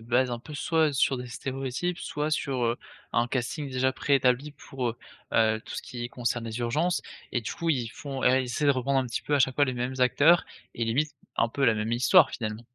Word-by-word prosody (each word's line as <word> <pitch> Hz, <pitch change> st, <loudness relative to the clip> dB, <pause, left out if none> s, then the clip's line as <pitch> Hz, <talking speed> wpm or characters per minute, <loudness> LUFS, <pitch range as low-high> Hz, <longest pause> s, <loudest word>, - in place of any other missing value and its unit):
basent 125 Hz, +3 st, +1 dB
un 120 Hz, -, -3 dB
peu 150 Hz, +5 st, -10 dB
soit 160 Hz, 0 st, +2 dB
sur 135 Hz, 0 st, +2 dB
des 125 Hz, 0 st, -6 dB
stéréotypes, 135 Hz, +7 st, -3 dB
soit 150 Hz, +1 st, -3 dB
sur, 135 Hz, -4 st, -1 dB
heu, 115 Hz, +1 st, +1 dB, 0.4 s
un 120 Hz, -, +2 dB
casting 135 Hz, +3 st, -3 dB
déjà 130 Hz, +1 st, +1 dB
pré-établi 130 Hz, +2 st, +1 dB
pour, 130 Hz, -3 st, -4 dB
heu, 115 Hz, -, -11 dB, 0.3 s
heu, 110 Hz, -1 st, +3 dB
tout -, -, -8 dB
ce -, -, -4 dB
qui 120 Hz, -1 st, -6 dB
concerne 120 Hz, -1 st, -2 dB
les 115 Hz, 0 st, -5 dB
urgences 150 Hz, +9 st, 0 dB, 0.3 s
et 120 Hz, -, +1 dB
du 115 Hz, -, -4 dB
coup 165 Hz, -1 st, -1 dB
ils 125 Hz, -6 st, 0 dB
font 135 Hz, +2 st, -6 dB
ils 130 Hz, +1 st, +4 dB
essaient 125 Hz, +4 st, -1 dB
de 140 Hz, -, +6 dB
reprendre 135 Hz, +1 st, +1 dB
un 130 Hz, -, -3 dB
petit 115 Hz, -, -3 dB
peu 150 Hz, -, 0 dB
à -, -, +4 dB
chaque 130 Hz, -1 st, +3 dB
fois 145 Hz, -, +4 dB
les 130 Hz, -, -2 dB
mêmes 125 Hz, +2 st, -2 dB
acteurs 145 Hz, +7 st, +5 dB, 0.3 s
et 115 Hz, -, -1 dB
limite, 135 Hz, +7 st, +1 dB, 0.3 s
un 115 Hz, -, +3 dB
peu 135 Hz, +4 st, -1 dB
la 115 Hz, -3 st, +5 dB
même 110 Hz, +2 st, -2 dB
histoire 135 Hz, +5 st, +5 dB
finalement? 110 Hz, 0 st, -5 dB
130 Hz, 230 wpm, -27 LUFS, 120-145 Hz, 0.4 s, de